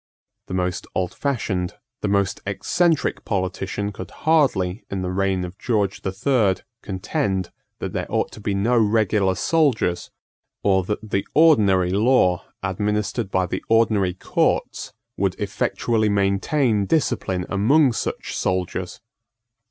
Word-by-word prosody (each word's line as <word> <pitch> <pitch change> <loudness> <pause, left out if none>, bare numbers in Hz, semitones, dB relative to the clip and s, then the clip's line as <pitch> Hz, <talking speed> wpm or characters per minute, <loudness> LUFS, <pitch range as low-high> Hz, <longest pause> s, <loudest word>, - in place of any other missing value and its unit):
The 95 - -4
most 90 0 -2
oldfashioned, 95 -2 -1 0.3
the - - -1
most 100 0 0
eccentric, 155 - +1
politician 95 +1 -2
could 95 -2 -8
hardly, 120 - +1
in 95 -1 -3
the 90 - -2
reign 95 -1 0
of 90 +2 -10
George 105 -5 0
the 95 - -2
Third, 100 -3 +1 0.2
contend 95 - -2 0.3
that - - -5
there - - -2
ought - - 0
to 105 - -11
be 100 -1 -1
no 110 +6 +2
regular 105 -3 +2
soldiers, 125 - +1 0.5
or 95 -1 +3
that 105 +1 -4
the 95 - 0
ordinary 100 - +5
law, 100 -4 +3 0.2
administered 105 +3 -1
by 95 -1 +1
the 90 - -4
ordinary 110 -5 +3
courts, - - -1 0.3
would 95 -2 0
effectually 105 +2 0
maintain 100 +3 +1
discipline 105 - 0
among 130 +7 +3
such - - -4
soldiers. 90 0 -2
100 Hz, 130 wpm, -22 LUFS, 95-115 Hz, 0.5 s, ordinary